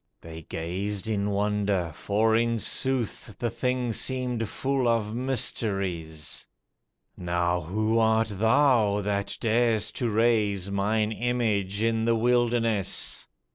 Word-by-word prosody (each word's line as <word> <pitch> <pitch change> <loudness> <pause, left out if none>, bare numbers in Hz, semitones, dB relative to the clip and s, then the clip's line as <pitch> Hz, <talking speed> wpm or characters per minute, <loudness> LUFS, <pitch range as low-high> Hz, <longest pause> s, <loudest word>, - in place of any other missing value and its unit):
They 80 0 -9
gazed 95 +6 -4
in 105 -2 -1
wonder, 100 -3 0
for 110 +6 +1
in 115 0 +1
sooth 120 -1 -2
The 120 -2 -2
thing 125 -1 -1
seemed 125 -3 -1
full 135 +1 -1
of 110 -2 0
mysteries. 95 - -1 0.7
"Now 85 0 -1
who 110 +7 0
art 110 0 +2
thou 110 -1 +3
that 100 0 -2
dar'st 115 -1 +1
to 120 - 0
raise 105 -4 +1
Mine 105 +2 0
image 110 -4 -1
in 115 0 +1
the 115 0 +3
wilderness? 115 -3 +1
110 Hz, 115 wpm, -26 LUFS, 100-115 Hz, 0.7 s, thou